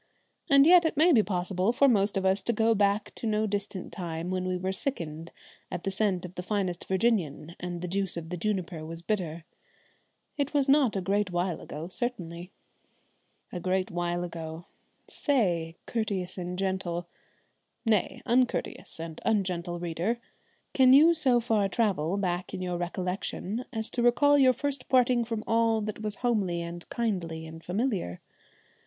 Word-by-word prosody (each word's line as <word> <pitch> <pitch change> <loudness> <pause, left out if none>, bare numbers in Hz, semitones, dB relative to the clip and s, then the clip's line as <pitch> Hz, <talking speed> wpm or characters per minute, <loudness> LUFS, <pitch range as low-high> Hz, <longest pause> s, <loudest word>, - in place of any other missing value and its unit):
And 275 0 +7
yet 350 +1 +8
it 320 -3 -1
may 330 +4 +6
be 240 -8 +6
possible 185 +1 0
for 275 +3 +4
most 205 -5 +3
of 190 - -1
us 190 +1 +3
to 235 - 0
go 225 +1 +3
back 200 0 +1
to 230 - -5
no 215 0 +1
distant 205 -2 -4
time 170 -1 -4
when 185 0 -1
we 185 +1 -1
sickened 165 - -4 0.4
at 175 - -5
the 195 - -1
scent 190 -2 0
of 180 - -9
the 180 - -5
finest 185 -2 -2
Virginian 185 -6 0
and 175 -1 -5
the - - -2
juice 190 0 -1
of 165 -1 -6
the - - -1
juniper 180 -4 -2
was 165 +1 -7
bitter. 170 -6 -2 0.9
It 285 +1 -1
was 280 -1 +3
not 275 -5 +4
a 195 - 0
great 200 +1 0
while 175 -1 -1
ago 155 +3 -7
certainly! 180 -5 -5 1.0
A 180 - -4
great 185 +1 -1
while 175 0 -1
ago! 165 -1 -6 0.4
Say, 175 - 0
courteous 200 -6 -2
and 180 -1 -5
gentle 185 -3 -2 0.8
nay, 220 -3 +1
uncourteous 245 -7 0
and 165 -1 -7
ungentle 180 -5 0
reader 175 +7 -1 0.6
can 260 -1 +6
you 315 +5 +8
so 265 -7 +4
far 220 -4 +1
travel 195 -6 0
back 180 -2 -2
in - - -5
your 180 -1 -2
recollection 185 +5 -3
as 220 -3 -4
to 245 - -1
recall 285 +5 +5
your 260 -2 +6
first 280 +1 -3
parting 250 -2 +4
from 225 -2 -4
all 225 0 +2
that 215 0 -5
was 210 -1 -1
homely 200 -8 +1
and 170 0 -7
kindly 180 -9 -2
and 160 +1 -10
familiar? 190 - -2
190 Hz, 165 wpm, -28 LUFS, 175-230 Hz, 1.0 s, yet